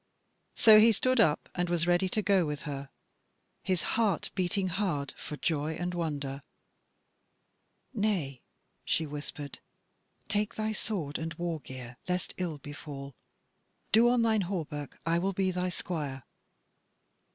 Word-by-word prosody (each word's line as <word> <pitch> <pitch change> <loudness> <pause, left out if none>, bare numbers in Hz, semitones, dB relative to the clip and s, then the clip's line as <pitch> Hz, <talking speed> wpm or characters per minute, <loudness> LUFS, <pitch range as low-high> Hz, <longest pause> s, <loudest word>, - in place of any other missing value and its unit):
So 215 -1 +9
he 225 +2 +7
stood 255 +4 +2
up 155 -9 +3
and 175 0 -1
was 170 -1 +1
ready 175 +2 +3
to 215 +3 0
go 195 -3 +4
with 150 -2 -3
her, 140 -2 -5 0.7
his 185 -3 0
heart 215 -7 +1
beating 185 0 0
hard 170 -7 -1
for 150 - -7
joy 155 0 0
and 180 0 -2
wonder. 145 -5 -3 1.5
"Nay," 190 - 0 0.4
she 160 - +1
whispered, 145 -1 -6 0.7
"take 210 +1 0
thy 215 0 -1
sword 195 -9 -2
and 160 0 -4
war 170 -1 -2
gear 130 -3 -9
lest 180 0 -1
ill 175 -4 -2
befall: 140 -1 -8 0.8
do 230 +3 +6
on 245 -1 +3
thine 220 -2 +3
hauberk; 155 -6 -4
I 165 +1 +2
will 195 +2 0
be 190 0 +1
thy 180 0 -1
squire." 150 -7 -4
175 Hz, 140 wpm, -30 LUFS, 145-195 Hz, 1.5 s, So